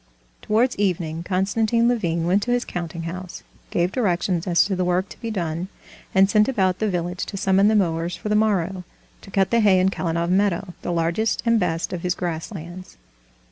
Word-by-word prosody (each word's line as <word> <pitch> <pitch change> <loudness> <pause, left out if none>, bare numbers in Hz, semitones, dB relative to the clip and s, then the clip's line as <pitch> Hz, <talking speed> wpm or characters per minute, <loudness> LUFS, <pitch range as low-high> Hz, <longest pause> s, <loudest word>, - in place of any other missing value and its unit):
Towards 235 +4 +1
evening 170 -5 -1
Konstantin 215 +6 +1
Levin 170 -9 0
went 185 +4 +2
to 245 - -2
his 245 0 +1
counting 170 -1 -5
house, 180 +2 -7 0.3
gave 175 +1 0
directions 185 -6 0
as 170 -1 +4
to 195 - -1
the 185 - 0
work 180 +2 +1
to - - -13
be 230 - -3
done, 175 -4 -3 0.5
and 190 0 +6
sent 210 +1 +3
about 190 -8 +1
the 215 - +1
village 180 0 -2
to 200 - -6
summon 195 +1 +3
the 215 - +3
mowers 170 -3 0
for - - -6
the 210 - +1
morrow, 195 -4 +1 0.4
to - - -13
cut 195 -1 +1
the 235 - +4
hay 200 -4 +5
in 185 +1 +3
Kalinov 170 -2 -1
meadow, 190 -1 +1
the - - -3
largest 170 +6 0
and 230 -1 +3
best 170 -1 -1
of 175 - -4
his 180 0 -1
grass 165 -1 -4
lands. 185 0 -9
185 Hz, 200 wpm, -23 LUFS, 170-205 Hz, 0.5 s, and